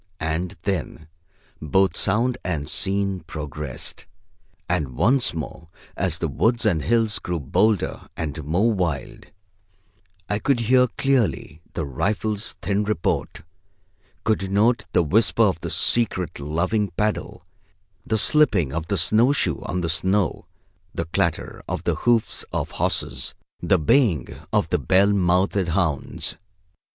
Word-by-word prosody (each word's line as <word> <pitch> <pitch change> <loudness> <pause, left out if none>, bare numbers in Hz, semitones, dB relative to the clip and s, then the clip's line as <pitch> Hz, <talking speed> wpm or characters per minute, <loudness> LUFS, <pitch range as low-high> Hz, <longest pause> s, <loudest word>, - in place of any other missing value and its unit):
And 80 +3 -2
then 80 -4 -3 0.5
both 95 +3 +2
sound 120 +5 +1
and 80 -6 -2
scene 100 -1 0
progressed, 75 -5 -6 0.6
and 75 -8 -1
once 125 - +3
more 80 +1 -6 0.3
as 90 -3 0
the 85 - -1
woods 115 - +1
and 85 -8 +2
hills 115 +1 +1
grew 90 -1 -3
bolder 100 +9 +1
and 80 -1 -4
more 90 +11 +2
wild, 85 -8 -3 1.0
I 105 - -1
could 125 0 +1
hear 125 +2 +4
clearly 120 - 0
the 80 - -1
rifle's 105 - -2
thin 100 +1 +1
report, 105 -6 -2 0.8
could 100 -4 0
note 110 +5 +2
the 90 - +3
whisper 110 +7 +3
of 95 -6 +1
the - - -4
secret 95 -10 0
loving 95 +8 0
paddle, 105 -6 -2 0.6
the 110 - 0
slipping 105 - +3
of 80 0 -3
the 100 - 0
snow 110 - +4
shoe 90 - 0
on 90 - -2
the 85 - -1
snow, 95 +1 0 0.5
the 85 - -2
clatter 80 - -1
of - - -3
the - - +1
hoofs 120 -2 +1
of - - -2
horses, - - -2 0.3
the - - +3
baying 85 - +2 0.2
of - - +2
the - - +1
bell 100 +2 +4
mouthed 95 0 +2
hounds. 85 -4 -1
95 Hz, 135 wpm, -23 LUFS, 80-110 Hz, 1.0 s, hear